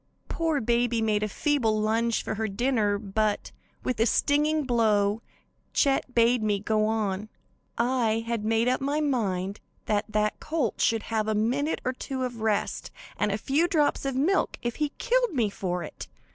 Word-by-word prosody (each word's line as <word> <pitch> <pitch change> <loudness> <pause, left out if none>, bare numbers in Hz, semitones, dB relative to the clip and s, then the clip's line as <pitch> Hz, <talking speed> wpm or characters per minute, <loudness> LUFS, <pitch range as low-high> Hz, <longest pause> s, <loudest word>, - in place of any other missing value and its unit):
"Poor 325 -3 0
baby 235 0 +1
made 215 -2 +1
a 215 - 0
feeble 225 -2 +1
lunge 225 +2 +1
for - - -3
her 220 +1 -2
dinner, 215 -1 +1
but, 210 +1 -1 0.3
with 255 - -2
a 225 - +4
stinging 300 +5 +2
blow, 220 -4 +2 0.5
Chet 270 -2 +1
bade 235 0 +4
me 210 -2 +1
go 215 +1 +1
on. 215 -2 -1 0.5
I 235 -2 +1
had 230 -2 -2
made 225 +2 +2
up 255 +1 +1
my 285 +2 0
mind 200 -9 -1 0.3
that 210 0 0
that 210 0 0
colt 305 -8 -2
should 225 -1 +2
have 215 -1 +1
a 215 - +1
minute 255 +8 0
or 255 - 0
two 260 0 -4
of 240 -3 -4
rest 215 -2 -1 0.3
and 210 - 0
a 200 - 0
few 285 +9 +1
drops 310 -5 +1
of 270 -1 -2
milk 320 +9 +1
if 240 -1 -2
he 300 -1 0
killed - - +1
me 225 -5 +1
for 180 -3 -3
it. - - -8
230 Hz, 175 wpm, -27 LUFS, 215-270 Hz, 0.5 s, a